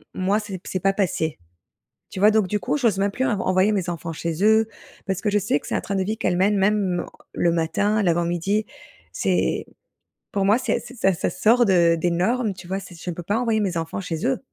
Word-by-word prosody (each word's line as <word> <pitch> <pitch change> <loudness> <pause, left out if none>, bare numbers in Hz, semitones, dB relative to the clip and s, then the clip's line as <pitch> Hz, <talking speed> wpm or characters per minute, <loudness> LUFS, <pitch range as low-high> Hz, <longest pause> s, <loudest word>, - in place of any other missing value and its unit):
moi 195 +3 +1
c'est 205 -3 -6
p - - -39
c'est 185 - -2
pas 195 0 +2
passé. 165 - -1 0.7
Tu - - -6
vois? 210 +2 +6
Donc, 215 -2 +3
du 210 +3 -1
coup, 295 - -1
j'ose 225 -8 +1
même 200 - +2
plus 260 +5 -1
en 210 -6 0
envoyer 185 +3 +2
mes 190 -4 -1
enfants 170 -1 -5
chez 170 +3 -3
eux 220 +1 +5 0.4
parce 190 -1 -1
que 210 - 0
je 210 - +3
sais 165 -6 0
que - - -15
c'est - - -4
un - - 0
train 200 - -4
de 190 - +1
vie 215 +4 -2
qu'elles 180 -1 0
mènent, 200 +2 +3
même, 195 -3 +1
heu, - - -7 0.3
le 170 - +2
matin, 200 +6 +1
l'avant-midi. 175 +4 0 0.5
C'est - - 0 0.7
pour 200 -1 0
moi, 210 +4 +4
c'est 255 - 0
c'est 255 - -11
ça 195 -4 +2
ça - - -1
sort 240 +3 +3
de 170 -3 +4
des 175 +2 0
normes, 210 +4 0
tu 180 -1 -12
vois? 190 - -2
C'est 190 -2 -11
je 180 - -4
ne - - -5
peux 175 - -5
pas 205 +4 0
envoyer 230 -3 +1
mes 190 -4 -1
enfants 165 +2 -3
chez 175 +1 -4
eux! 260 0 +1
195 Hz, 250 wpm, -23 LUFS, 175-210 Hz, 0.7 s, vois